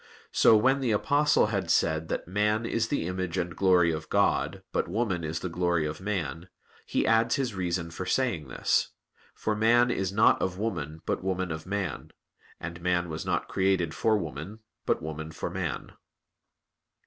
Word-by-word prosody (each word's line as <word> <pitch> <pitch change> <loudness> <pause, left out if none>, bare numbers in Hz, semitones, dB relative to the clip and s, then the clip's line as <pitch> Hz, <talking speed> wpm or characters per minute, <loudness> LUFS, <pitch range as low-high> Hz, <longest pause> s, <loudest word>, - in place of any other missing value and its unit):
So 110 - +6
when 135 +6 +3
the 130 -3 0
Apostle 145 +3 +3
had 95 -4 -1
said 80 -1 +2
that - - -3
"man 105 +4 +1
is 115 0 0
the 140 - -1
image 90 0 -3
and 85 -2 -2
glory 90 -3 +4
of 80 -1 -5
God, - - +1
but - - 0
woman 95 -2 -1
is 80 +1 -3
the - - -2
glory 85 -2 0
of 75 +3 -5
man," 90 -4 -3 0.4
he - - 0
adds 115 +1 +3
his 130 -5 -1
reason 85 -3 -2
for 90 +3 -5
saying 105 - 0
this: - - 0 0.4
"For 110 - -1
man 120 +3 +4
is 95 -4 -1
not 105 +3 +4
of 95 -1 -1
woman, 85 -8 -4
but - - -2
woman 95 -2 -1
of 80 +2 -6
man; 100 -6 -3 0.5
and 85 0 -7
man 90 0 0
was 80 0 -5
not - - 0
created 95 -4 +1
for 110 -1 +2
woman, 85 +4 -6 0.3
but - - +1
woman 80 0 -5
for 80 - -5
man." - - -4
95 Hz, 175 wpm, -28 LUFS, 85-105 Hz, 0.5 s, So